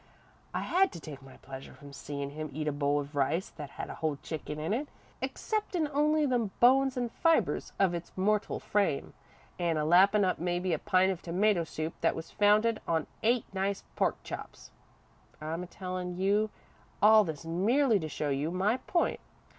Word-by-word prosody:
I -, -, -2 dB
had 380 Hz, +1 st, +2 dB
to -, -, -7 dB
take 145 Hz, -3 st, -9 dB
my 135 Hz, -1 st, -14 dB
pleasure 135 Hz, 0 st, -10 dB
from 145 Hz, -1 st, -13 dB
seein' 140 Hz, 0 st, -5 dB
him 155 Hz, +1 st, -5 dB
eat 155 Hz, +2 st, -4 dB
a -, -, +2 dB
bowl 145 Hz, 0 st, +1 dB
of 145 Hz, +1 st, -6 dB
rice 145 Hz, +6 st, 0 dB
that 150 Hz, -3 st, -8 dB
had -, -, -4 dB
a -, -, -6 dB
whole 155 Hz, -2 st, 0 dB
chicken 150 Hz, -2 st, -5 dB
in 160 Hz, +7 st, -1 dB
it, 280 Hz, +6 st, -1 dB, 0.3 s
exceptin' 400 Hz, -7 st, -1 dB
only 300 Hz, +1 st, +3 dB
the 245 Hz, -6 st, +1 dB
bones 265 Hz, +2 st, +5 dB
and 240 Hz, -2 st, -1 dB
fibres 330 Hz, +4 st, +1 dB
of 190 Hz, -3 st, +3 dB
its 170 Hz, 0 st, -5 dB
mortal 210 Hz, +2 st, +1 dB
frame, 200 Hz, -9 st, 0 dB, 0.5 s
an' 170 Hz, -2 st, +1 dB
a 150 Hz, -, 0 dB
lappin' 195 Hz, +5 st, +5 dB
up 185 Hz, -, 0 dB
mebbe 175 Hz, +1 st, 0 dB
a 155 Hz, -, 0 dB
pint 185 Hz, +1 st, +3 dB
of 185 Hz, -1 st, -5 dB
tomato 185 Hz, +1 st, +2 dB
soup 160 Hz, 0 st, -4 dB
that -, -, +2 dB
was 160 Hz, 0 st, -7 dB
founded 215 Hz, +2 st, +3 dB
on 160 Hz, -2 st, +1 dB, 0.2 s
eight 235 Hz, +1 st, +2 dB
nice 195 Hz, +1 st, -1 dB
pork -, -, +1 dB
chops. -, -, -8 dB, 0.7 s
I'm 160 Hz, +3 st, -4 dB
a 180 Hz, -, -6 dB
tellin' 180 Hz, -1 st, -5 dB
you 205 Hz, +3 st, +2 dB, 0.5 s
all 215 Hz, +1 st, +7 dB
this 160 Hz, -3 st, -6 dB
merely 215 Hz, -, +2 dB
to 160 Hz, -2 st, -4 dB
show 150 Hz, 0 st, -2 dB
you 140 Hz, +3 st, 0 dB
my 195 Hz, +7 st, +1 dB
point. 340 Hz, +6 st, 0 dB
185 Hz, 185 wpm, -30 LUFS, 155-215 Hz, 0.7 s, all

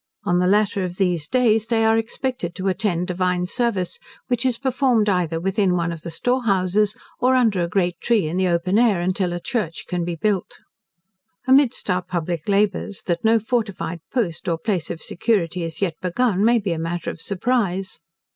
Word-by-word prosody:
On 175 Hz, 0 st, +2 dB
the 180 Hz, -, +2 dB
latter 200 Hz, 0 st, +2 dB
of 180 Hz, 0 st, -5 dB
those 175 Hz, -6 st, 0 dB
days 225 Hz, -2 st, +2 dB
they 225 Hz, -1 st, +2 dB
are 220 Hz, 0 st, +4 dB
expected 225 Hz, -5 st, -3 dB
to 190 Hz, +1 st, -1 dB
attend 185 Hz, -2 st, 0 dB
divine 180 Hz, 0 st, 0 dB
service, 200 Hz, -3 st, -1 dB, 0.3 s
which 250 Hz, +1 st, +1 dB
is 245 Hz, -2 st, 0 dB
performed 255 Hz, -4 st, +1 dB
either 175 Hz, -4 st, +1 dB
within 195 Hz, +1 st, +1 dB
one 170 Hz, -1 st, 0 dB
of 165 Hz, -2 st, -7 dB
the 170 Hz, -, -6 dB
storehouses, 210 Hz, -, +1 dB, 0.2 s
or 255 Hz, +1 st, +3 dB
under 225 Hz, -7 st, +3 dB
a 170 Hz, -, 0 dB
great 175 Hz, -1 st, -1 dB
tree 220 Hz, -8 st, +2 dB
in 160 Hz, -, -3 dB
the 185 Hz, 0 st, +2 dB
open 180 Hz, +4 st, +1 dB
air, 225 Hz, -6 st, +3 dB
until 185 Hz, +1 st, 0 dB
a 175 Hz, -, -3 dB
church 180 Hz, -5 st, -3 dB
can 180 Hz, -1 st, -2 dB
be 170 Hz, 0 st, -3 dB
built. 195 Hz, +2 st, -1 dB, 0.9 s
Amidst 265 Hz, -1 st, +3 dB
our 180 Hz, 0 st, +1 dB
public 175 Hz, -1 st, -3 dB
labours, 200 Hz, 0 st, 0 dB
that 170 Hz, -2 st, -2 dB
no 225 Hz, +1 st, +5 dB
fortified 215 Hz, -6 st, -2 dB
post, 195 Hz, -12 st, -2 dB
or 165 Hz, -2 st, +1 dB
place 185 Hz, -3 st, -2 dB
of 160 Hz, -, -5 dB
security, 180 Hz, -4 st, 0 dB
is 165 Hz, +3 st, -4 dB
yet 175 Hz, -4 st, 0 dB
begun, 195 Hz, +2 st, +1 dB
may 235 Hz, +2 st, +5 dB
be 200 Hz, -6 st, -1 dB
a 160 Hz, -, -4 dB
matter 165 Hz, +1 st, -3 dB
of -, -, -10 dB
surprise. 195 Hz, -2 st, -1 dB
190 Hz, 190 wpm, -22 LUFS, 175-225 Hz, 0.9 s, no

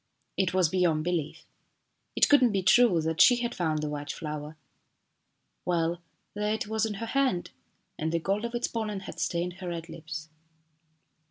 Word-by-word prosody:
It 190 Hz, -2 st, +1 dB
was 185 Hz, -2 st, +3 dB
beyond 165 Hz, -2 st, +1 dB
belief. 170 Hz, -3 st, -2 dB, 0.7 s
It -, -, +5 dB
could 290 Hz, -2 st, +6 dB
not 245 Hz, -3 st, +4 dB
be 195 Hz, -2 st, 0 dB
true 235 Hz, -4 st, +5 dB
that 160 Hz, +2 st, 0 dB
she 245 Hz, -, +8 dB
had 240 Hz, 0 st, -2 dB
found 155 Hz, -3 st, -1 dB
the -, -, -1 dB
white 145 Hz, -1 st, -4 dB
flower. 150 Hz, 0 st, -6 dB, 1.1 s
Well, 170 Hz, -1 st, 0 dB, 0.3 s
there 210 Hz, +1 st, 0 dB
it 220 Hz, -, -3 dB
was 220 Hz, +1 st, 0 dB
in 210 Hz, -, -4 dB
her 230 Hz, -, -4 dB
hand, 260 Hz, -8 st, 0 dB, 0.5 s
and 160 Hz, +1 st, -1 dB
the 170 Hz, -, +1 dB
gold 195 Hz, +6 st, -1 dB
of 235 Hz, 0 st, -3 dB
its 240 Hz, -, 0 dB
pollen 215 Hz, -4 st, -3 dB
had -, -, -9 dB
stained 175 Hz, +1 st, -1 dB
her 180 Hz, -, -5 dB
red 170 Hz, 0 st, -5 dB
lips. 160 Hz, -1 st, -7 dB
180 Hz, 180 wpm, -28 LUFS, 160-215 Hz, 1.1 s, she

